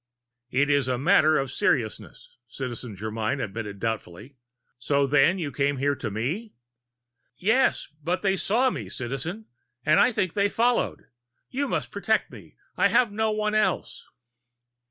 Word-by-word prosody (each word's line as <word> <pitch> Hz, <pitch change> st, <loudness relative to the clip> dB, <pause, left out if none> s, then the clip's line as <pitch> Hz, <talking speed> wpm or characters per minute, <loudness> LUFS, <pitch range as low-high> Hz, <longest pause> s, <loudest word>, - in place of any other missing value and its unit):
"It 140 Hz, +3 st, +2 dB
is 140 Hz, -3 st, +2 dB
a 130 Hz, -1 st, 0 dB
matter 155 Hz, +1 st, +4 dB
of 135 Hz, -2 st, -1 dB
seriousness," 115 Hz, -4 st, -2 dB
Citizen 120 Hz, -3 st, -6 dB
Germyn 110 Hz, +6 st, -2 dB
admitted 105 Hz, -3 st, -5 dB
doubtfully. 110 Hz, +3 st, -4 dB, 0.4 s
"So 140 Hz, +2 st, +2 dB
then 145 Hz, +6 st, +4 dB
you 155 Hz, -6 st, -3 dB
came 140 Hz, 0 st, 0 dB
here 140 Hz, +2 st, +1 dB
to 110 Hz, -, -4 dB
me?" 145 Hz, -, -3 dB, 0.8 s
"Yes, 225 Hz, -, +2 dB, 0.2 s
but 175 Hz, +5 st, -1 dB
they 195 Hz, -1 st, +2 dB
saw 240 Hz, +7 st, +2 dB
me, 105 Hz, -, -6 dB
Citizen! 135 Hz, -, -5 dB, 0.4 s
And 155 Hz, 0 st, +5 dB
I 250 Hz, -, +5 dB
think 185 Hz, -6 st, -1 dB
they 200 Hz, 0 st, +2 dB
followed. 235 Hz, +3 st, 0 dB, 0.5 s
You 280 Hz, +2 st, -1 dB
must -, -, -2 dB
protect -, -, 0 dB
me -, -, -13 dB, 0.2 s
I -, -, +4 dB
have 240 Hz, -4 st, +3 dB
no 220 Hz, +1 st, 0 dB
one 215 Hz, 0 st, -1 dB
else!" 215 Hz, 0 st, 0 dB
145 Hz, 150 wpm, -26 LUFS, 120-205 Hz, 0.8 s, And